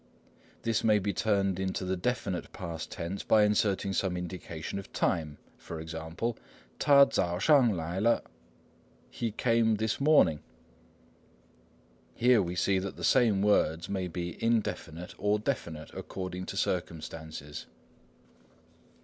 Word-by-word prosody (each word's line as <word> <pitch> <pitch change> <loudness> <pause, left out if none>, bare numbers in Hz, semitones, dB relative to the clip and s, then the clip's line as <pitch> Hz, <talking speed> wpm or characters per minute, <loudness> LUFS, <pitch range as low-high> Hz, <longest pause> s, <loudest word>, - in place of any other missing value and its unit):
This 115 -1 0
may 110 -1 +5
be 100 0 -1
turned 100 -2 +1
into 95 0 -2
the 95 +1 0
definite 100 -3 -2
past 85 -3 -6
tense 85 +4 -4
by 110 -1 +4
inserting 100 -2 +1
some 95 -2 0
indication 90 0 -5
of 95 - -11
time; 75 -3 -1 0.4
e.g. 80 0 -7 0.8
他早上来了 110 - +3 0.5
= - - -33
"he 115 - -2
came 115 0 +2
this 110 +1 -1
morning." 140 - +4 1.7
Here 120 -2 +4
we 90 -1 -3
see 95 +2 +2
that 95 0 -5
the - - -9
same 110 -6 +4
words 85 -5 +2
may 95 -2 -2
be 85 -1 -5
indefinite 100 -7 -1
or 105 +1 +2
definite 85 - -4
according 90 -1 -6
to - - -5
circumstances. 80 -4 -4
95 Hz, 115 wpm, -30 LUFS, 85-110 Hz, 1.7 s, may